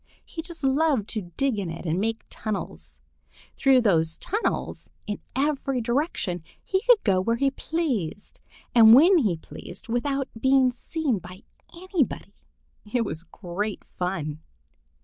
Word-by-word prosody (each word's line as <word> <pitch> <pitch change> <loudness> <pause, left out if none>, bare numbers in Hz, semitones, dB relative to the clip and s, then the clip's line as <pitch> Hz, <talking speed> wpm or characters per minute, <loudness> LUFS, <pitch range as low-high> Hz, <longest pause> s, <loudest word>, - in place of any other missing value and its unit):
He 325 - -6
just 330 -2 -8
loved 270 -5 +2
to 205 -6 -1
dig 270 -6 +1
in 190 -4 -3
it 165 +2 -7
and 165 +2 0
make 225 +1 -1
tunnels. 215 -2 -5 0.5
Through 265 -2 +5
those 165 -7 +2
tunnels 425 +5 -2 0.2
in 210 -1 -4 0.2
every 275 -1 0
direction 235 - -1 0.2
he 380 0 0
could 485 -1 +5
go 190 -3 +3
where 230 +5 +1
he 275 +3 +1
pleased 260 - -3 0.3
and 225 -2 +9
when 345 +7 +7
he 200 - +1
pleased 175 +5 -11
without 270 +3 0
being 265 0 +4
seen 265 - -2
by 185 +2 -12 0.3
anybody. 355 -5 -2 0.6
It 240 -1 +1
was 160 - -4
great 190 +3 -5
fun! 165 -4 -4
235 Hz, 140 wpm, -25 LUFS, 190-280 Hz, 0.6 s, and